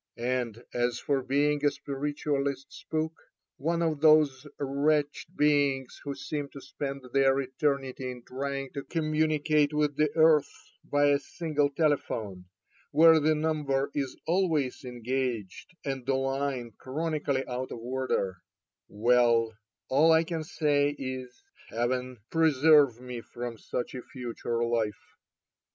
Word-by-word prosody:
And 120 -1 -2
as 120 0 0
for 140 +1 0
being 145 +3 +1
a 145 - +5
spiritualist 140 -1 -3
spook, 160 0 -3 0.4
one 170 +4 0
of 155 -3 -1
those 155 -3 +4
wretched 145 +4 0
beings 140 -3 +2
who 140 -1 -4
seem 145 -2 -4
to 140 - -8
spend 140 0 -6
their 135 0 +4
eternity 135 -1 -2
in 125 -1 -8
trying 135 +1 -4
to 140 - -4
communicate 155 -2 +1
with 150 -1 +1
the 150 0 +3
earth 160 -2 +5 0.3
by 145 0 +2
a 140 0 +3
single 150 -4 -1
telephone, 120 - -1 0.4
where 160 +2 +7
the 155 +1 +3
number 150 -3 0
is 135 -3 -3
always 160 -8 0
engaged, 125 - -4
and 135 -2 -3
the 135 - +2
line 135 -2 -2
chroni 155 +3 -3
cally 135 -2 0
out 125 +1 -4
of - - -5
order 120 -6 -2 0.3
— - - -63
well, 115 0 +3 0.3
all 150 +5 +4
I 160 0 +5
can 165 -1 -3
say 145 -2 +1
is. 130 -1 -5 0.4
Heaven 125 +2 -2
preserve 150 -5 +5
me 125 -1 -7
from 120 -1 -7
such 120 - -4
a 130 - -5
future 120 -2 -4
life. 115 -3 0
140 Hz, 135 wpm, -28 LUFS, 125-150 Hz, 0.4 s, where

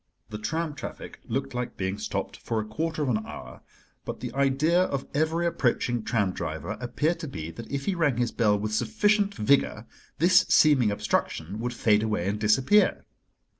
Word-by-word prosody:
The 105 - -5
tram 160 +8 -2
traffic 145 - -8
looked 135 +3 -3
like 125 0 -4
being 95 +1 -2
stopped 105 - -3
for 115 - -3
a 110 - -3
quarter 155 +7 -2
of 140 - -1
an 110 -3 0
hour; - - -10 0.4
but - - -6
the - - -6
idea 140 +6 +2
of 140 -5 -3
every 160 +3 +1
approaching 120 -6 0
tram 105 -4 0
driver 80 0 -5
appeared 150 +7 -1
to 160 - -5
be 80 - -6
that 115 +7 -10
if 140 -1 -3
he 195 - +1
rang 155 -8 +1
his 120 -1 0
bell 105 -3 +2
with 105 +1 -3
sufficient 205 - +2
vigor 110 -1 +2 0.3
this 180 +4 +5
seeming 140 -8 +5
obstruction 100 -2 -2
would 120 +1 -3
fade 105 -2 +3
away 105 -5 -1
and 105 +1 -1
disappear. 130 - +3
125 Hz, 180 wpm, -27 LUFS, 105-155 Hz, 0.4 s, this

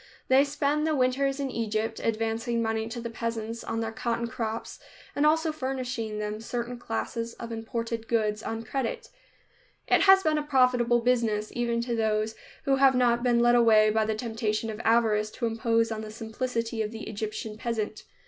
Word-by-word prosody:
They 265 +1 +6
spend 290 +1 0
the 310 - +1
winters 270 +1 +1
in 275 -2 -2
Egypt, 220 -1 -2
advancing 225 +1 -1
money 225 -1 -1
to 240 +1 -5
the 235 - -4
peasants 230 0 -4
on 225 0 -2
their 225 0 -2
cotton 235 +1 -2
crops 225 -1 -4 0.4
and 295 +1 +3
also 320 +1 +3
furnishing 255 -6 -3
them 210 0 -3
certain 240 +1 -4
classes 230 0 -3
of 235 0 -7
imported 230 0 -4
goods 215 -2 0
on 225 0 -4
credit. 245 +1 -3 0.8
It - - +4
has 385 0 +7
been 310 -1 +2
a - - -3
profitable 250 -4 +3
business, 230 -3 +1
even 235 -1 0
to 235 0 -2
those 220 -1 0 0.3
who 270 -1 +2
have 270 -1 +5
not 240 -1 +3
been 240 -1 +3
led 240 0 +5
away 220 -3 +5
by 220 0 +2
the 220 0 -1
temptation 220 -1 -2
of 215 +2 -6
avarice 220 -2 +3
to 240 - -3
impose 230 0 +1
on 220 -1 -3
the 215 - -7
simplicity 230 +1 -3
of 215 - -1
the 225 0 -8
Egyptian 215 0 -4
peasant. 220 -2 -3
230 Hz, 180 wpm, -27 LUFS, 220-250 Hz, 0.8 s, has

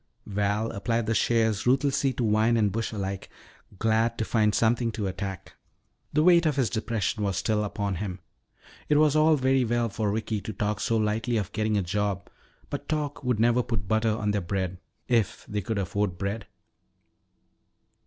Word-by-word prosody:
Val 105 +2 -1
applied 115 +3 -1
the 115 - 0
shears 110 0 +1
ruthlessly 135 +1 +2
to 125 -3 -1
vine 110 +2 +3
and 105 -3 +2
bush 115 +3 -2
alike, 100 -3 -4 0.5
glad 115 +2 +1
to 110 - -1
find 105 -2 +2
something 115 +1 +2
to 110 -2 -3
attack. 95 0 -5 0.6
The 150 - +2
weight 170 -1 +6
of 150 - +1
his 130 -6 +1
depression 110 -1 -1
was 100 -3 0
still 105 -1 +1
upon 100 -2 -2
him. 95 -1 -4 0.7
It 150 - +4
was 150 -1 +4
all 155 +1 +5
very 130 -1 +2
well 120 0 0
for 105 0 -1
Ricky 110 0 -2
to 110 - -6
talk 105 +1 -1
so 115 +2 +1
lightly 110 +2 0
of 100 -5 -2
getting 110 -1 0
a 100 - +1
job, 100 0 -2 0.4
but - - -5
talk 150 -2 -2
would 125 -4 0
never 120 +2 +4
put 110 -5 -3
butter 110 +1 +2
on 105 -1 0
their 100 -1 0
bread 95 0 -3 0.3
if 115 -6 +1
they 105 0 -2
could 105 +3 -3
afford 100 -1 -1
bread. 100 +2 -3
110 Hz, 180 wpm, -27 LUFS, 100-120 Hz, 0.7 s, weight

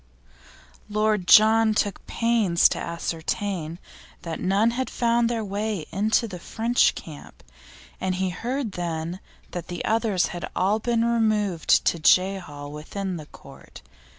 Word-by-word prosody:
Lord 210 -3 0
John 220 0 +6
took 205 -2 -1
pains 225 -7 +3
to - - -3
ascertain 170 0 -3 0.5
that 165 -2 -5
none 200 +5 +2
had 260 +2 -3
found 235 -1 +1
their 230 -2 -2
way 200 -3 -3
into 220 +5 +1
the 180 -4 -8
French 230 +7 +1
camp, 155 -3 -11 0.6
and 185 -1 -1
he 190 0 -1
heard 245 +5 -3
then 170 0 -4 0.3
that 175 - -6
the 175 - -5
others 220 -4 +1
had 175 - -5
all 200 +4 +1
been 230 0 0
removed 215 -7 +2
to 170 - +1
Jehal 160 -3 +1
with 150 +1 -9
the 185 -6 -4
Court. - - -14
200 Hz, 135 wpm, -24 LUFS, 175-225 Hz, 0.6 s, John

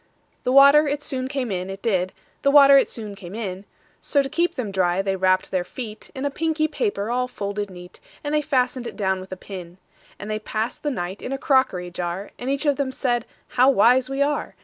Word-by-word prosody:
The 250 - +2
water 280 +3 +7
it 290 +1 -2
soon 260 -2 -3
came 265 -4 -3
in, 185 0 -3
it 195 +1 -8
did; 185 -5 +1 0.3
The 280 - +3
water 280 -1 +8
it 275 - +5
soon 215 -3 -6
came 195 -1 -10
in:So, 205 +7 -3
to 270 - -5
keep 345 +4 0
them 225 -6 -3
dry, 185 0 +1
they 195 -1 0
wrapp'd 185 0 +1
their 185 -2 0
feetIn 240 +6 -7
a 285 - 0
pinky 310 +1 0
paper 310 - -2
all 250 +1 0
folded 205 -3 -4
neat:And 180 +10 -9
they 300 - +3
fasten'd 255 -4 0
it - - -7
down 190 -2 0
with 185 +1 -11
a 185 - -5
pin. 180 -3 -9 0.4
And 205 - -8
they 215 - -1
pass'd 220 +2 -3
the 295 - -1
night 190 -7 -4
in - - -5
a 270 - -1
crockery 260 - +1
jar; 175 +3 -4
And 250 - -4
each 280 +2 -1
of 285 -2 +2
them 275 -2 -1
said, 240 -3 -1 0.2
"How 255 +2 +4
wise 255 +1 +4
we 270 +1 +1
are! 290 0 -2
240 Hz, 215 wpm, -23 LUFS, 190-275 Hz, 0.4 s, water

